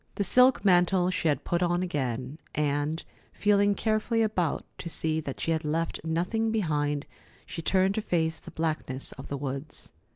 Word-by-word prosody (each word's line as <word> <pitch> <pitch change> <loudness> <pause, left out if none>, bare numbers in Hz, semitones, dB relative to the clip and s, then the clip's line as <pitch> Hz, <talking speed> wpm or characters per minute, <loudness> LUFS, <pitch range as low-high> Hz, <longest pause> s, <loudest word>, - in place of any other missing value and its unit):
The 200 - 0
silk 250 +2 +5
mantle 180 0 +4
she 160 -5 +2
put 175 +4 -2
on 175 0 +1
again, 135 -4 -3 0.2
and, 150 +2 0 0.3
feeling 205 0 +3
carefully 225 +2 +1
about 185 -7 0
to 170 - -5
see 160 -1 +1
that 140 -3 -6
she 165 - -1
had 160 -1 0
left 160 +2 -2
nothing 180 +8 0
behind, 150 -9 0 0.4
she 165 - -6
turned 190 +3 +2
to 220 - -1
face 160 -5 0
the - - -11
blackness 155 -5 -3
of 135 - -9
the 140 - -3
woods. 140 +2 -5
165 Hz, 165 wpm, -28 LUFS, 150-195 Hz, 0.4 s, silk